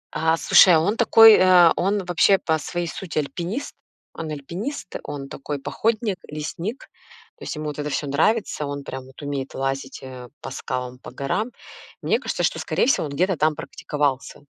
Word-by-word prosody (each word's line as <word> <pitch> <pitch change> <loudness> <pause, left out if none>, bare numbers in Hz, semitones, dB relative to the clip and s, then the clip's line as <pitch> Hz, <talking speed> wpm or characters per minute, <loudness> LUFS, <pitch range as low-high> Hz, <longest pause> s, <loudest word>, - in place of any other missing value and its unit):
А 160 +1 +2
слушай, 180 0 +7
а - - +5
он 200 +7 +1
такой, 225 -1 +8
э, 180 -3 +6
он 195 +1 0
вообще 180 +2 +4
по 160 -3 -1
своей 175 +3 -3
сути 165 -2 -6
альпинист, 170 - -3 0.4
он 160 -1 -6
альпинист, 180 - -6
он 140 -1 -6
такой 145 +1 -5
походник, 220 - -1
лесник, 165 - -5 0.5
то - - -12
есть - - -5
ему 155 0 -5
вот 150 0 -5
это 150 - -2
всё 150 - -2
нравится, 155 +2 0
он 140 0 -5
прям 130 -1 -7
вот 130 - -16
умеет 140 -2 -4
лазить, 135 0 -3
э, 125 -2 -9
по 135 - -8
скалам, 125 -1 -5
по - - -10
горам, 210 - -2 0.5
мне - - +2
кажется, - - -3
что - - 0
скорее - - 0
всего 245 - +2
он - - -8
где-то 185 +2 +1
там 155 +1 +2
практиковался. 145 -2 -3
155 Hz, 180 wpm, -23 LUFS, 140-190 Hz, 0.5 s, такой